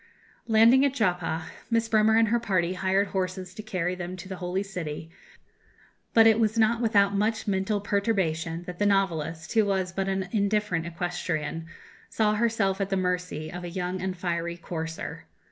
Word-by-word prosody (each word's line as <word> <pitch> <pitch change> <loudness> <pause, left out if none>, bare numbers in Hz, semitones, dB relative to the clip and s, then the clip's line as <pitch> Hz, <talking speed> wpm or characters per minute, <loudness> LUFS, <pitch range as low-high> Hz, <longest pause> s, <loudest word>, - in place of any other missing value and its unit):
Landing 230 +4 +6
at 275 -1 +1
Joppa, 175 -7 0 0.2
Miss 230 -1 +1
Bremer 220 0 +4
and 225 -1 +4
her 235 +1 +2
party 185 -6 0
hired 190 +1 +1
horses 185 -1 -3
to 215 - -7
carry 185 -5 -2
them 180 0 -5
to 185 +1 -9
the 190 -1 -6
Holy 180 +2 -2
City; 165 -5 -6 1.0
but 225 -1 +8
it 225 0 +6
was 220 0 +1
not 225 +1 +3
without 200 -3 +3
much 215 +3 0
mental 200 +1 0
perturbation 190 -5 -1
that 175 0 -8
the 205 - +3
novelist, 165 -5 0
who 220 -2 +5
was 190 -2 -1
but 195 0 -1
an 190 -1 -1
indifferent 200 -5 0
equestrian, 165 -2 -3 0.4
saw 215 -1 +2
herself 210 -3 +1
at 195 - -1
the 195 - 0
mercy 180 -4 -2
of 180 0 -6
a 175 - -5
young 180 +1 -3
and 185 -1 -3
fiery 170 -1 -2
courser. 160 -1 -6
190 Hz, 175 wpm, -27 LUFS, 175-215 Hz, 1.0 s, but